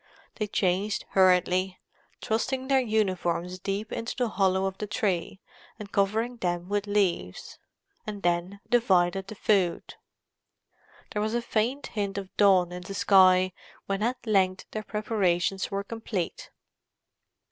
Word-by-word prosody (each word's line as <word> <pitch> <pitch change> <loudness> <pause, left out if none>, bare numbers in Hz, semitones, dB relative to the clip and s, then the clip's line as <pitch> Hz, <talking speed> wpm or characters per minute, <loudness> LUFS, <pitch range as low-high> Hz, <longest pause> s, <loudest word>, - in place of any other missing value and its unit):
They 215 - -1
changed 195 +1 0
hurriedly, 185 0 +3 0.5
thrusting 260 +4 -1
their 270 -1 +5
uniforms 185 -6 -1
deep 200 +3 -3
into 230 - -4
the 245 -3 0
hollow 190 -2 +1
of 190 0 -4
the 210 - -3
tree 195 -4 -2 0.4
and 210 -3 -9
covering 220 +5 0
them 175 -3 -2
with 205 0 -1
leaves; 195 - -1 0.5
and 205 -2 -6
then 175 +3 -1
divided 190 -5 +2
the 215 - -8
food. 190 -4 +1 1.2
There 210 - -2
was 215 +2 -1
a - - +2
faint 240 +6 -1
hint 200 -2 -3
of 195 -1 -7
dawn 190 -4 +4
in 180 0 -6
the 195 +2 -7
sky 185 -2 +5 0.3
when 195 +1 -2
at 245 +3 -2
length 190 -3 +1
their 215 - -3
preparations 195 -3 0
were 200 0 -2
complete. 215 -4 -4
195 Hz, 135 wpm, -27 LUFS, 185-215 Hz, 1.2 s, their